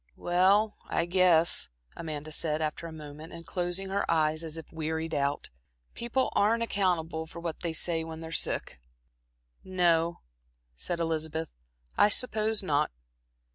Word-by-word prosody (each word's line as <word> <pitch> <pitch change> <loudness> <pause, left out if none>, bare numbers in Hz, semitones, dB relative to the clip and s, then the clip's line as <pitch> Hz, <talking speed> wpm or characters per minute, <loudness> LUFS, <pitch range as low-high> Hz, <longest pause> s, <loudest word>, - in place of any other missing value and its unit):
"Well, 195 +5 +3
I 170 - 0
guess," 175 -2 +4 0.3
Amanda 155 -2 -5
said, 155 0 +1
after 155 +1 -2
a - - -8
moment 155 0 -9
and 165 0 -9
closing 175 +2 -2
her 195 +1 0
eyes 155 0 +2
as 160 0 -4
if 160 - -10
wearied 160 0 -2
out, 140 0 -1 0.4
"people 240 +3 -1
aren't 225 +3 +3
accountable 170 -7 0
for 170 - -9
what 170 -2 -4
they 170 - -2
say 165 0 0
when 160 0 -7
they're 160 0 -7
sick." 65 - -1 0.8
"No," 170 -2 +2 0.5
said 170 - -3
Elizabeth, 160 -1 -2 0.5
"I 205 - +7
suppose 220 -2 +2
not." 150 -4 +2
165 Hz, 140 wpm, -29 LUFS, 160-185 Hz, 0.8 s, I